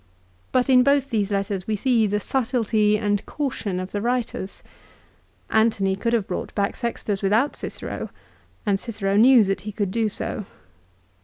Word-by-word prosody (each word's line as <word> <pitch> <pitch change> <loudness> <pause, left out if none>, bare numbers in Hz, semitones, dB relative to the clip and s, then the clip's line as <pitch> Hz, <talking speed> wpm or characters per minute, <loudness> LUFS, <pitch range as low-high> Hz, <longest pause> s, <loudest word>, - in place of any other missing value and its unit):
But 255 -1 +2
in 255 -2 +6
both 280 +1 +2
these 210 -3 0
letters 195 -2 -2
we 220 - 0
see 230 0 +2
the 205 +1 0
subtilty 225 -3 +1
and 205 -1 0
caution 240 -10 -3
of 185 +1 -5
the 205 - -2
writers. 235 -4 -2 0.9
Antony 215 -4 +2
could 230 +4 -1
have 225 -4 +2
brought 180 - -5
back 200 +1 0
Sextus 220 -4 -3
without 220 +8 +2
Cicero, - - -6 0.6
and 200 -2 +2
Cicero 200 -4 -2
knew 240 +2 +7
that 195 -1 -1
he 210 - -6
could 200 -2 -2
do 225 +1 +1
so. 210 -1 -4
215 Hz, 160 wpm, -23 LUFS, 200-240 Hz, 0.9 s, knew